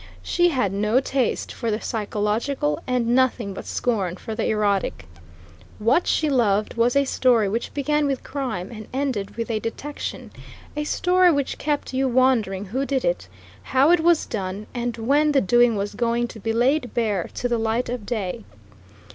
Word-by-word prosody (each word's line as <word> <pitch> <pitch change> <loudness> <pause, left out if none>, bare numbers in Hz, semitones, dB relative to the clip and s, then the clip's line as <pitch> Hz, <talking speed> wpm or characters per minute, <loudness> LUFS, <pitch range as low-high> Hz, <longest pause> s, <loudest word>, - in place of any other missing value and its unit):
She 350 0 +2
had 250 - 0
no 210 +5 +2
taste 265 -2 -1
for 230 - -3
the 215 0 0
psychological, 210 - -1
and 250 -2 0
nothing 245 -5 +1
but - - -8
scorn 200 -8 -1
for 220 - -6
the 220 - -1
erotic. 200 - 0 0.7
What 240 +11 +2
she 310 - +2
loved 215 -7 +2
was 235 +2 +2
a 280 0 +4
story 245 -5 +3
which 230 +4 -2
began 295 +1 +1
with 270 -2 -2
crime 245 -10 -4
and 215 -2 -9
ended 255 -7 -2
with 230 0 -2
a 220 - 0
detection 285 +7 -6 0.4
a 300 0 -2
story 360 +3 +3
which 285 -3 -1
kept 295 -2 -2
you 265 +1 +1
wondering 235 -6 +2
who 250 +8 -2
did 275 -2 -1
it, 175 - -1 0.3
how 265 - +3
it 350 - +5
was 335 0 +3
done, 195 0 -4
and 240 -1 -3
when 290 +6 +2
the 275 - +5
doing 240 +3 +4
was 200 0 -3
going 235 +2 0
to 220 - -10
be 225 +2 -2
laid 245 +2 +1
bare 210 -7 0
to 245 - -1
the 240 -1 0
light 225 +2 0
of 245 -2 -4
day. 205 - -3
235 Hz, 180 wpm, -23 LUFS, 210-270 Hz, 0.7 s, it